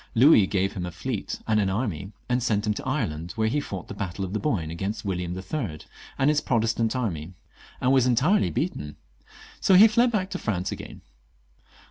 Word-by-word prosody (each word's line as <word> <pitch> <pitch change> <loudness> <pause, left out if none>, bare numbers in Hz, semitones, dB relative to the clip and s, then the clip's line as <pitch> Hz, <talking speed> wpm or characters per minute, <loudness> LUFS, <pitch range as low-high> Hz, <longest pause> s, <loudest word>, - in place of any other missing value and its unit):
Louis 115 -5 +6
gave 95 0 0
him 90 -2 -4
a - - -6
fleet 95 +6 -4
and 110 -1 +3
an 100 -2 +1
army, 100 -3 -2 0.2
and 125 0 +1
sent 110 -3 0
him 105 - +1
to - - -7
Ireland, 80 +4 -2
where 110 -1 0
he 145 +6 +1
fought 95 -10 -6
the - - -7
battle 100 -1 -4
of 95 - -7
the 105 - 0
Boyne 95 - -1
against 95 +6 -4
William 90 -2 -2
III. 95 - -4 0.4
and 135 - +2
his 150 0 +3
Pro 120 - +1
testant 115 +1 0
army, 90 -8 -3 0.4
and 125 - +2
was 130 -2 +4
entirely 130 - +3
beaten; 75 -2 -3 0.6
so 190 - +4
he 205 +5 +9
fled 235 +2 +3
back 195 -4 -1
to 185 - -3
France 95 -4 -2
again. - - -8
105 Hz, 200 wpm, -26 LUFS, 90-130 Hz, 0.6 s, he